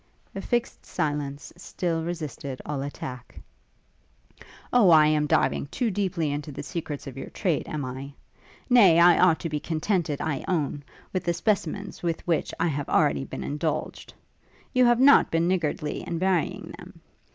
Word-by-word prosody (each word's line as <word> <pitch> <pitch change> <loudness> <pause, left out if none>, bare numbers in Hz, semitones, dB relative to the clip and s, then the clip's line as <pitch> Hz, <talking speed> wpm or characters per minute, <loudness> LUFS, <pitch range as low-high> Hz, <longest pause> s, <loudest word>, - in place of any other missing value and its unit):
A 195 - -5
fixed 240 +3 -2
silence 145 -2 -3
still 175 -2 -3
resisted 155 -5 -5
all 145 -2 -3
attack. 130 -3 -7 1.3
'O, 235 -7 +6
I 155 -2 +7
am 150 -1 +2
diving 145 - +1
too 235 - -1
deeply 185 -6 -1
into 145 +1 -4
the 140 - -7
secrets 150 -1 -5
of 135 -2 -8
your - - -7
trade, 175 -7 -1
am 150 -3 -4
I? 135 +2 -7 0.5
Nay, 200 -10 +6
I 175 0 +6
ought 175 -3 +4
to 165 - -3
be 150 -1 -2
contented, 160 -1 -1
I 150 -4 -2
own, 145 -5 -1 0.3
with 185 - -1
the 170 -1 0
specimens 205 -1 -2
with 170 -2 -3
which 165 -3 0
I 165 - +2
have 145 -3 -3
already 145 -3 +2
been - - -6
indulged. 150 +2 -3 0.6
You 255 -1 +5
have 240 0 +4
not 280 +2 +6
been 165 +1 +1
niggardly 155 -4 -1
in 170 - -4
varying 185 -1 -1
them. - - -13
160 Hz, 165 wpm, -26 LUFS, 145-185 Hz, 1.3 s, I